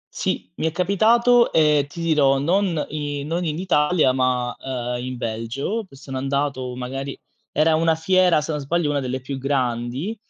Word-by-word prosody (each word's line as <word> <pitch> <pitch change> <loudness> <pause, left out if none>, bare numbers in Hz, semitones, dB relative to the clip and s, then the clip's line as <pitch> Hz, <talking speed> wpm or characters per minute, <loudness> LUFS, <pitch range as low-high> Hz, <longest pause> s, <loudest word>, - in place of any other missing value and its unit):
Sì, 90 - -2
mi 160 - 0
è - - -1
capitato 230 +7 +3
e, 150 -3 +3
ti 170 - -10
dirò, 145 -4 +3
non 170 +2 +1
i 145 -2 -4
non 170 +4 -2
in 155 0 -2
Italia, 155 -5 +2
ma, 125 -1 0
uhm, 125 -2 -4
in 130 -1 -5
Belgio, 120 - -3
che 135 - -16
sono 135 -1 -6
andato, 135 -2 -2
magari 135 +2 -5 0.3
era 155 +2 +3
una 160 0 +3
fiera, 180 0 +3
se 155 - -4
non 150 - -2
sbaglio, 150 +1 0
una 145 - 0
delle 130 0 -3
più 135 +1 -5
grandi 130 - -2
145 Hz, 175 wpm, -22 LUFS, 130-165 Hz, 0.3 s, capitato